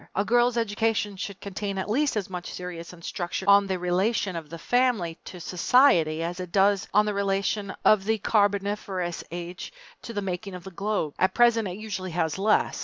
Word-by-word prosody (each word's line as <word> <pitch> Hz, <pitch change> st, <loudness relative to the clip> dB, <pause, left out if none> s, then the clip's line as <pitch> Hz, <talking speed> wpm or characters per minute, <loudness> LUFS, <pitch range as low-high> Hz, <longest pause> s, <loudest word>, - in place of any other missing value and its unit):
A 200 Hz, -, +1 dB
girl's 240 Hz, +1 st, +3 dB
education 215 Hz, -2 st, 0 dB
should 195 Hz, +1 st, -6 dB
contain 200 Hz, 0 st, -4 dB
at 190 Hz, -, -2 dB
least 270 Hz, +3 st, +1 dB
as 200 Hz, -, -2 dB
much 180 Hz, -1 st, -6 dB
serious 180 Hz, -2 st, -7 dB
instruction 175 Hz, +2 st, -5 dB
on 200 Hz, 0 st, +6 dB
the 190 Hz, -1 st, -1 dB
relation 185 Hz, +2 st, 0 dB
of 160 Hz, -3 st, -6 dB
the 165 Hz, -, -7 dB
family 220 Hz, -5 st, +1 dB
to 180 Hz, -, -9 dB
Society 170 Hz, -, +3 dB
as 175 Hz, +2 st, -4 dB
it 180 Hz, -2 st, -6 dB
does 200 Hz, 0 st, +3 dB
on 210 Hz, 0 st, +4 dB
the 210 Hz, -, -1 dB
relation 200 Hz, +1 st, -1 dB
of 205 Hz, -3 st, +5 dB
the 220 Hz, +1 st, +1 dB
Carboniferous 200 Hz, -4 st, 0 dB
Age 175 Hz, +1 st, -6 dB, 0.3 s
to -, -, -7 dB
the 205 Hz, -3 st, -3 dB
making 190 Hz, +1 st, -4 dB
of 180 Hz, -, -9 dB
the 190 Hz, -, -9 dB
globe. 195 Hz, -5 st, -2 dB
At 185 Hz, +1 st, +2 dB
present, 235 Hz, -3 st, +4 dB
it 180 Hz, 0 st, -5 dB
usually 205 Hz, -4 st, -5 dB
has 160 Hz, 0 st, -1 dB
less. 210 Hz, +2 st, +2 dB
195 Hz, 190 wpm, -26 LUFS, 180-210 Hz, 0.3 s, on